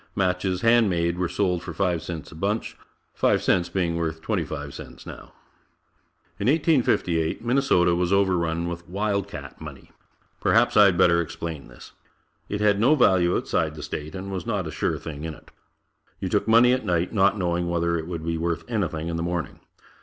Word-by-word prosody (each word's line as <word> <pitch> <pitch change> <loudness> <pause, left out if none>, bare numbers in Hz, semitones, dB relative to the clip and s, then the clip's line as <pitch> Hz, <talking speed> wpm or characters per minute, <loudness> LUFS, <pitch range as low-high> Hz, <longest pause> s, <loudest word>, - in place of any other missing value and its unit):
Matches, 90 0 0
hand 115 -2 +4
made, 85 0 0
were 90 -2 0
sold 90 -4 0
for 85 -2 -8
five 90 -3 0
cents 80 -1 -7
a - - -11
bunch 100 +7 -2 0.4
five - - +2
cents 85 -1 +2
being 85 -2 -1
worth 80 -1 -2
twenty 80 - -1
five 75 -2 -6
cents - - -11
now. - - -10 1.1
In 100 - -1
1858 120 - +1
Minnesota 120 -9 +3
was 90 +1 0
overrun 85 -4 +1
with 85 0 -7
"Wild 100 +1 -1
Cat" 70 -7 -9
money. - - -10 0.5
Perhaps - - +3
I 105 - +8
had 90 -3 +3
better 85 0 +4
explain 80 -2 -6
this. - - -14 0.6
It 105 0 -3
had 105 -1 +3
no 130 +8 +5
value 95 -9 +3
outside 80 -1 -1
the 75 - -8
state 75 0 -6
and 95 +1 -6
was 95 -3 -5
not 100 -5 -1
a 80 - -5
sure - - -1
thing 75 -2 -8
in 80 -1 -5
it. - - -19 0.7
You - - -3
took - - 0
money 120 +2 +6
at 130 - -1
night, 90 -2 0
not 100 0 +3
knowing 85 -2 -1
whether 85 0 0
it 80 -1 -3
would 85 -2 -5
be 85 -1 -2
worth 85 0 -2
anything 85 -8 -2
in 85 0 -2
the - - -2
morning. 85 -3 -3
90 Hz, 190 wpm, -24 LUFS, 85-100 Hz, 1.1 s, I